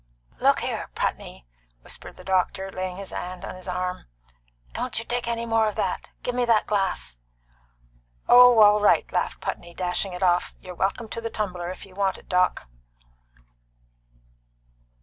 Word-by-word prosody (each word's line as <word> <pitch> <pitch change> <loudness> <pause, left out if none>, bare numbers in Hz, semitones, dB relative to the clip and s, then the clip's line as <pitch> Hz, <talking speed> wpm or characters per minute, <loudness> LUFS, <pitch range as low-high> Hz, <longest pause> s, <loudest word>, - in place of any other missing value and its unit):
"Look - - +3
here, - - -3
Putney," 60 - -3 0.4
whispered - - -10
the - - -12
doctor, 190 0 0
laying 185 -1 -4
his 195 -1 -8
hand 185 +1 -6
on - - -6
his 185 0 -12
arm, 180 - -3 0.7
"don't 250 -3 -3
you 230 - -2
take 245 0 -2
any 235 0 -1
more 225 -1 +2
of 210 - -3
that. - - -2
Give 245 - -2
me 250 0 +1
that 230 -2 +3
glass!" 190 - -1 1.1
"Oh, 245 -1 +8
all 210 0 +7
right!" 205 - +4
laughed - - -1
Putney, 170 0 -5
dashing 180 +1 -1
it 180 +1 -4
off. 180 -1 +2
"You're 185 -1 -9
welcome 195 +6 -1
to 230 - -5
the 230 - -3
tumbler, 180 -6 -3
if 185 - -7
you 190 - -17
want 195 -1 0
it, - - -17
Doc." 180 - +1
195 Hz, 165 wpm, -25 LUFS, 180-225 Hz, 1.1 s, Oh